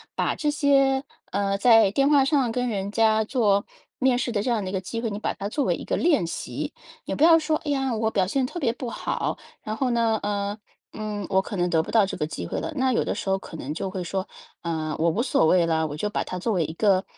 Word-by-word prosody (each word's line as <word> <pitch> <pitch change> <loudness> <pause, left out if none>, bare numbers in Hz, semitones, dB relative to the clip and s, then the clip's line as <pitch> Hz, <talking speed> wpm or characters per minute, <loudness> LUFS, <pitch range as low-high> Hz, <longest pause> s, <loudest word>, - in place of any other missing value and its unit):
把 - - 0
这 300 - -1
些， 275 -2 +3 0.3
呃， 195 0 0
在 225 -4 +6
电 275 +6 +2
话 280 -2 +5
上 270 -4 +2
跟 250 +2 -1
人 200 -4 -2
家 220 0 +3
做 210 -4 +1 0.3
面 260 -1 +3
试 245 0 -1
的 205 - 0
这 250 - -2
样 230 -4 +1
的 185 - -4
一 - - -8
个 190 - -1
机 230 +5 -5
会， 230 -2 -2
你 205 - -4
把 - - -2
它 200 0 -4
作 280 +6 -1
为 - - +2
一 - - -8
个 - - -1
练 305 - +2
习。 165 - -5 0.3
也 - - -3
不 - - -6
要 330 0 +8
说， 315 -1 0
哎 305 - -7
呀， 270 -4 0
我 220 0 0
表 195 -4 +1
现 255 +7 0
特 345 - -6
别 235 -6 +1
不 245 0 -5
好， - - -2 0.2
然 215 - -4
后 260 +1 0
呢， 230 -2 +2
呃， 205 0 -2 0.4
嗯， 210 -2 -4
我 190 -1 +3
可 205 - -7
能 175 0 +1
得 160 -2 +2
不 - - -8
到 220 -3 +5
这 - - -4
个 150 - -1
机 90 - -6
会 - - -3
了。 - - -4
那 260 -2 +2
有 - - +2
的 - - -1
时 - - -4
候 190 - +2
可 180 - -10
能 145 0 -5
就 180 +4 -3
会 185 -1 -4
说， 190 +2 -3 0.3
呃， 160 -2 -2
我 165 +1 +2
无 190 +8 0
所 250 - +2
谓 170 +1 +4
了， 160 -1 +1
我 145 - -6
就 210 +6 -1
把 - - -1
它 185 - -5
作 220 +5 -1
为 180 -4 +1
一 - - -5
个 190 +1 +2
215 Hz, 295 characters per minute, -25 LUFS, 190-255 Hz, 0.4 s, 要